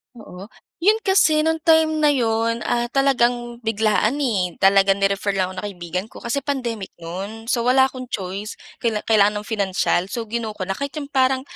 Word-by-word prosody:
Oo. 195 -4 -11 0.3
'Yon 420 +6 +3
kasi, 380 -6 +3
no'ng 320 +1 +1
time 320 -1 +5
na 305 - +3
'yon, 230 -2 0
ah, 240 0 0
talagang 245 -3 +1
biglaan 220 +1 +1
eh. 190 -9 0
Talagang 195 0 +4
ni-refer 200 0 +1
lang 185 -1 0
ako - - -9
ng - - -5
kaibigan 180 0 -5
ko, - - -14
kasi 235 +4 -1
pandemic 245 -8 -4
no'n. 200 +7 -6
So 235 -2 0
wala 265 +1 +5
akong 255 -1 -8
choice 200 0 -5 0.2
kaila 220 -3 -1
kailangan 210 -1 +2
ng - - -15
financial, 190 -3 0
so 230 +4 -4
gino 225 -2 -3
ko 195 - -7
na. 195 - -1
Kahit 280 -1 -4
yung 290 -2 -6
parang, 260 -1 +2
225 Hz, 185 wpm, -21 LUFS, 200-265 Hz, 0.3 s, time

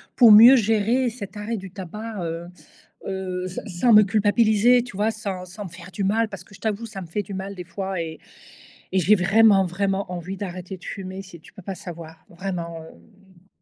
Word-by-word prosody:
pour 235 -4 +8
mieux 235 +5 +10
gérer 225 +3 +2
cet 210 -4 -9
arrêt 220 +2 -3
du 190 -1 -8
tabac, 210 +4 -7
heu 165 +1 -5 0.6
heu, 185 -1 -4
s 185 - -7
sans 205 +6 +2
me 210 0 +9
culpabiliser 220 +3 +3
tu 240 -6 -10
vois? 215 +2 +1
Sans 195 -4 -5
sans 190 +3 -9
me - - -10
faire 180 +2 -12
du 195 +3 -3
mal, 220 +3 +1
parce 190 -4 -9
que 200 - -18
je - - -23
t'avoue 220 +1 -2
ça 205 -3 -8
me - - -8
fait 205 +6 -3
du 195 +1 -8
mal 195 +1 -5
des 180 -1 -8
fois 190 0 -4
et 160 -1 -7 0.7
et 190 - +2
j'ai 205 +5 +5
vraiment, 195 +1 +4
vraiment 195 +1 -2
envie 180 +2 -5
d'arrêter 185 -1 -6
de - - -21
fumer, 190 -1 -6
c'est 175 -3 -13
tu - - -18
peux 195 - -12
pas 190 +1 -6
savoir 165 -3 -10
vraiment, 170 -3 -5
hem 175 - -19
195 Hz, 210 wpm, -23 LUFS, 180-215 Hz, 0.7 s, mieux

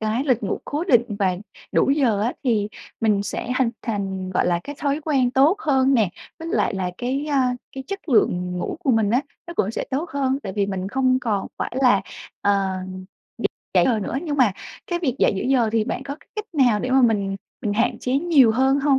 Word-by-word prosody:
cái 220 +5 0
lịch 255 -5 +1
ngủ - - -1
cố 295 +4 -2
định 240 - +2
và 185 -3 +1 0.4
đủ - - +3
giờ 255 -8 +2
á, 240 - 0
thì 215 -5 +1 0.3
mình 210 -3 +2
sẽ 235 - -4
hình 255 -3 +2
thành, 195 -4 -3
gọi 185 - +1
là, 175 -1 +1
cái 290 - -6
thói 285 +1 0
quen 275 -5 +1
tốt 280 +9 +4
hơn 270 -4 +3
nè, 220 -6 +3 0.3
với 325 +1 -6
lại 330 - +1
là 185 -1 -2
cái, 270 +4 -2
a, 260 -3 +2 0.2
cái 265 0 -7
chất 395 -3 -6
lượng 180 -7 +2
ngủ 180 - -3
của 270 - +1
mình 220 -3 +2
á, 245 - +3 0.3
nó 340 - -7
cũng 205 - +1
sẽ - - -3
tốt 300 +6 -2
hơn, 270 -1 0
tại 190 - -5
vì 200 -1 0
mình 190 -1 -3
không 255 +2 +2
còn 215 -6 -1
phải - - -3
là, 245 -7 +5 0.4
ờ, 195 -2 +1 1.0
dậy - - +5
giờ 235 -4 +2
nữa. 200 - -4
Nhưng 295 -4 -2
mà 245 -7 +4 0.3
cái 345 -1 -1
việc 275 -8 -1
dậy - - +4
giữa - - -2
giờ, 255 -3 +2
thì 225 -1 +2
bạn 250 - -3
có 280 +1 -6
cái - - -22
cách 425 - -3
nào 245 -8 +3
để 255 - -2
mà 265 0 +5
mình 200 -4 +2 0.2
mình 205 - -1
hạn 225 +3 +1
chế 250 - -2
nhiều 290 -7 +5
hơn 265 +4 +3
hông? 275 -1 +3
250 Hz, 230 wpm, -22 LUFS, 205-275 Hz, 1.0 s, là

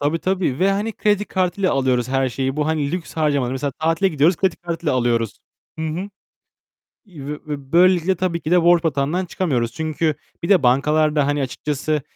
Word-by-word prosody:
Tabii, 145 +3 0
tabii 185 -7 -1
ve 190 +2 +3
hani 210 +3 -2
kredi 210 -1 +1
kartıyla 185 -1 0
alıyoruz 130 -2 +1
her 135 0 +1
şeyi. 135 +2 -3
Bu 150 -1 0
hani 155 -2 -1
lüks 175 -4 -5
harcamaları. 145 -5 +1
Mesela 140 +2 -2
tatile 165 +5 +2
gidiyoruz, 160 +1 +2
kredi 190 -1 0
kartıyla 170 -4 -3
alıyoruz. 120 -3 0 0.4
Hı - - -3
hı. 175 +6 -4 1.0
Ve 150 -4 -7
böylelikle 180 +1 +4
tabii 175 -1 -2
ki 155 - -5
de 175 -1 +4
borç 170 0 +4
batağından 155 +4 0
çıkamıyoruz. 130 -11 -1
Çünkü 155 +2 -1 0.3
bir 170 - -3
de 195 -7 +5
bankalar 150 +4 +2
da 145 -2 +3
hani 145 0 0
açıkçası 150 +3 -2
155 Hz, 180 wpm, -21 LUFS, 140-175 Hz, 1.0 s, de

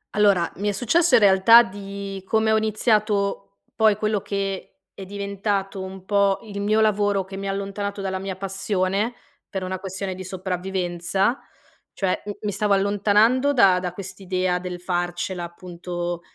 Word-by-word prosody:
Allora, 200 -5 +3
mi 205 +2 -1
è - - +2
successo 325 - +3
in - - +5
realtà 200 +4 +7
di, 200 -1 -7
come 220 +1 +2
ho 220 - +4
iniziato 210 - 0 0.2
poi 220 -2 +4
quello 215 -1 -1
che 195 -1 -4 0.2
è 195 - -9
diventato 200 0 -3
un 190 0 -8
po' 200 -1 +2
il 200 -2 -6
mio 215 +2 +2
lavoro, 205 -2 +2
che 190 +1 -9
mi 195 0 -5
ha - - 0
allontanato 200 +1 -4
dalla 190 -1 -2
mia 190 0 -4
passione, 195 +3 -1 0.4
per 190 -2 -4
una 185 0 -4
questione 190 0 -4
di 185 - -7
sopravvivenza 185 +3 -1 0.6
cioè 190 -2 0
m 205 - -4
mi 210 - -2
stavo 205 +1 +1
allontanando 210 +7 +3
da 195 -8 +5
da 180 -1 -4
quest'idea 185 -1 -2
del 180 0 -6
farcela, 175 0 -2
appunto, 175 0 -5
195 Hz, 160 wpm, -23 LUFS, 185-205 Hz, 0.6 s, realtà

